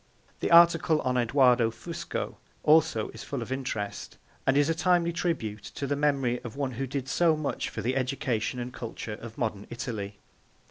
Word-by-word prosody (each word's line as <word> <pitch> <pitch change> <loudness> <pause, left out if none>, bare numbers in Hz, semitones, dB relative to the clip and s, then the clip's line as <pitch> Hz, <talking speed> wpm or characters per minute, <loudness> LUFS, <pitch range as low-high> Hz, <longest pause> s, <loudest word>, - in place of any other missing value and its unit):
The - - -1
article 170 -2 +6
on 125 0 0
Edoardo 125 -1 +4
Fusco 165 +9 -5 0.2
also 155 -7 +4
is - - -9
full - - -4
of - - -10
interest, 125 -6 -4 0.3
and 135 +1 +4
is 145 0 +4
a 165 - +2
timely 170 0 +2
tribute 115 - -2
to 140 - -3
the 145 +1 0
memory 135 -4 +1
of 120 -2 -8
one 140 -2 -2
who 135 +3 -3
did 135 0 -3
so 160 +2 +3
much 150 -2 -2
for - - -5
the 125 +3 0
education 125 -3 -1
and 125 +1 -5
culture 115 -2 -6
of 115 +2 -9
modern 110 -6 -2
Italy. 110 -4 -5
130 Hz, 180 wpm, -28 LUFS, 120-150 Hz, 0.3 s, article